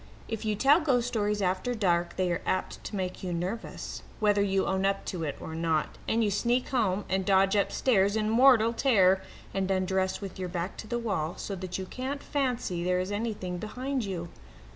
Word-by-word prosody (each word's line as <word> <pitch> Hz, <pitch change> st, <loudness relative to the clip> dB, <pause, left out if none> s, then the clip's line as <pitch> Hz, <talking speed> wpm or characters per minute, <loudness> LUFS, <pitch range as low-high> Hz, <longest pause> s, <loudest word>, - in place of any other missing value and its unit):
If 225 Hz, -1 st, -4 dB
you 215 Hz, -1 st, +1 dB
tell 275 Hz, +9 st, +5 dB
ghost 250 Hz, -6 st, +2 dB
stories 210 Hz, -3 st, 0 dB
after 185 Hz, +7 st, 0 dB
dark 175 Hz, -5 st, +1 dB
they 185 Hz, -1 st, 0 dB
are 175 Hz, -, -1 dB
apt 185 Hz, -, -2 dB
to -, -, -5 dB
make 185 Hz, -2 st, -3 dB
you 185 Hz, -, -3 dB
nervous, 180 Hz, +7 st, -4 dB, 0.2 s
whether 205 Hz, -2 st, +3 dB
you 195 Hz, -1 st, +1 dB
own 190 Hz, 0 st, 0 dB
up 195 Hz, 0 st, 0 dB
to 175 Hz, -3 st, -3 dB
it 145 Hz, -3 st, -3 dB
or 160 Hz, -, -7 dB
not, 160 Hz, -1 st, -1 dB
and 230 Hz, +1 st, +2 dB
you 210 Hz, -, +1 dB
sneak 240 Hz, +5 st, +1 dB
home 210 Hz, -6 st, +1 dB
and 190 Hz, +1 st, 0 dB
dodge 195 Hz, +1 st, +4 dB
upstairs 200 Hz, -1 st, +2 dB
in 215 Hz, -1 st, +1 dB
mortal 230 Hz, 0 st, +5 dB
terror, 195 Hz, -8 st, +4 dB, 0.3 s
and 190 Hz, -1 st, -1 dB
undress 190 Hz, 0 st, 0 dB
with 195 Hz, -2 st, -7 dB
your 185 Hz, -1 st, -3 dB
back 175 Hz, +1 st, -3 dB
to 215 Hz, -, -7 dB
the 240 Hz, -, -1 dB
wall, 190 Hz, -8 st, -2 dB
so 200 Hz, -, -5 dB
that 185 Hz, -1 st, -5 dB
you 190 Hz, -, -4 dB
can't 265 Hz, +8 st, -5 dB
fancy 250 Hz, -, -1 dB
there 180 Hz, 0 st, +1 dB
is 185 Hz, +2 st, -2 dB
anything 205 Hz, -4 st, -3 dB
behind 255 Hz, +5 st, -3 dB
you. 175 Hz, -4 st, -4 dB
195 Hz, 205 wpm, -29 LUFS, 185-230 Hz, 0.3 s, tell